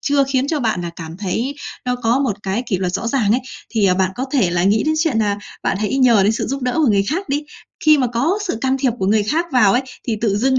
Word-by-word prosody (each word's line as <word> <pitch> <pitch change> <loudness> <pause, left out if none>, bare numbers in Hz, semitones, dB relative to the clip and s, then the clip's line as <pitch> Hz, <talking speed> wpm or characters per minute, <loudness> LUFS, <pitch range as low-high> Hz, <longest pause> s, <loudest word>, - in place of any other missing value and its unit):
chưa 280 -1 +2
khiến 270 0 0
cho 310 -3 0
bạn 220 -7 0
là 170 - -4
cảm 165 0 -8
thấy 225 +8 -2 0.3
nó 250 0 0
có 245 +1 +1
một 245 -8 0
cái 195 +5 -1
kỷ 190 -5 -1
luật 180 -1 -2
rõ 230 - -2
ràng 230 -5 +1
ấy, 245 - +2 0.3
thì, 215 -4 +2
à, 180 - +3
bạn 190 0 +1
có 255 - -3
thể 235 -11 +2
là 175 0 0
nghĩ 205 +3 +3
đến 310 - +2
chuyện 310 -8 +1
là 205 -2 +1 0.3
bạn - - 0
hãy 240 +6 0
nhờ 235 -6 +5
đến 205 +3 +3
sự 225 - -2
giúp 275 0 -3
đỡ 250 - 0
của 310 -3 +3
người 200 -3 +3
khác 315 - -3
đi. 290 +2 -1 0.4
Khi 305 -2 +6
mà 255 - +2
có 270 - 0
sự 285 - -2
can 265 +1 +1
thiệp 260 -2 +2
của 190 - -1
người 210 +1 +3
khác 310 +11 0
vào 215 -6 +5
ấy, 245 - +2 0.2
thì 225 - 0
tự 205 -3 +1
dưng 260 +4 +2
235 Hz, 290 wpm, -19 LUFS, 200-270 Hz, 0.4 s, Khi